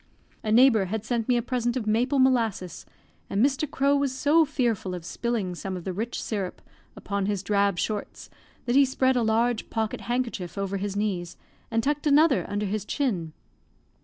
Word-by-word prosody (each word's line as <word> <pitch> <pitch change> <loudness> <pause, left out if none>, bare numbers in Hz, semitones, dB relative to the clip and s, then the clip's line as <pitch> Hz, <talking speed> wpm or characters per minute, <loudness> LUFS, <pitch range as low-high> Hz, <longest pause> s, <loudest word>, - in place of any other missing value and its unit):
A 215 - -1
neighbour 230 -3 +5
had 215 +3 -4
sent 235 -3 -1
me 245 - +4
a 235 - -1
present 245 0 -1
of 235 - -3
maple 240 +6 +1
molasses, 230 -9 +1 0.4
and 205 +5 +3
Mr. 280 +1 0
Crowe 280 0 +2
was 280 -1 +1
so 310 +4 +4
fearful 235 -10 -1
of 170 -2 -8
spilling 220 -4 -2
some 185 +1 -5
of 175 - -8
the 185 - -3
rich 225 +6 -3
syrup 200 -5 -4 0.4
upon 200 -1 -3
his 200 -2 -1
drab 200 -2 +1
shorts 210 +3 -4 0.4
that 240 0 0
he 280 - +7
spread 260 0 +2
a 245 - +2
large 230 +1 +1
pocket 220 -1 -2
hankerchief 235 -8 -3
over 195 0 -2
his 200 0 -3
knees, 185 -4 -2 0.3
and 225 0 0
tucked 295 +2 0
another 295 0 +4
under 205 +1 -1
his 205 +1 -2
chin. 195 - -2
225 Hz, 185 wpm, -26 LUFS, 200-255 Hz, 0.4 s, he